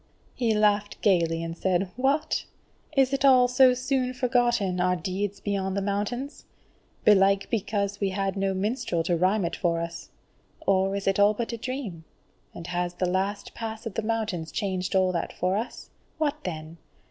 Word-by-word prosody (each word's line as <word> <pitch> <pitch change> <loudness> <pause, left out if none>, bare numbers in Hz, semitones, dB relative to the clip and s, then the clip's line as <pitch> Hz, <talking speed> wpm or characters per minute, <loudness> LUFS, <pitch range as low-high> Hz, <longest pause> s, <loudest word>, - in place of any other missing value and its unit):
He 230 -3 +1
laughed 210 -1 +2
gaily 165 -5 +2
and 165 0 -4
said: 185 +1 0
"What! 270 +5 0 0.5
is 270 0 +4
it 275 - 0
all 255 -2 +6
so 255 0 +5
soon 255 0 -1
forgotten, 240 -7 +1
our 180 0 +2
deeds 190 +4 -3
beyond 195 -1 -2
the - - +1
Mountains? 210 +8 -3 0.6
Belike 195 -1 +5
because 200 -2 -1
we 200 - +1
had 195 0 -2
no 195 -1 0
minstrel 190 -4 -1
to 175 +1 +1
rhyme 185 +3 +2
it 170 - -2
for 170 -3 0
us. 170 0 -6 0.6
Or 195 0 +2
is 200 - -3
it 195 0 +1
all 205 +1 +5
but 235 +2 -3
a - - -3
dream? 230 -9 -5 0.5
and 170 - -9
has 175 0 -2
the 180 - 0
last 195 +3 -2
pass 225 0 -6
of 225 - -4
the 225 - -1
mountains 215 -7 -2
changed 190 -2 -2
all 185 -1 +3
that 170 -2 -2
for 185 +2 0
us? 225 +4 -5 0.3
What 305 -1 -1
then! 160 -2 -6
200 Hz, 175 wpm, -26 LUFS, 185-230 Hz, 0.6 s, all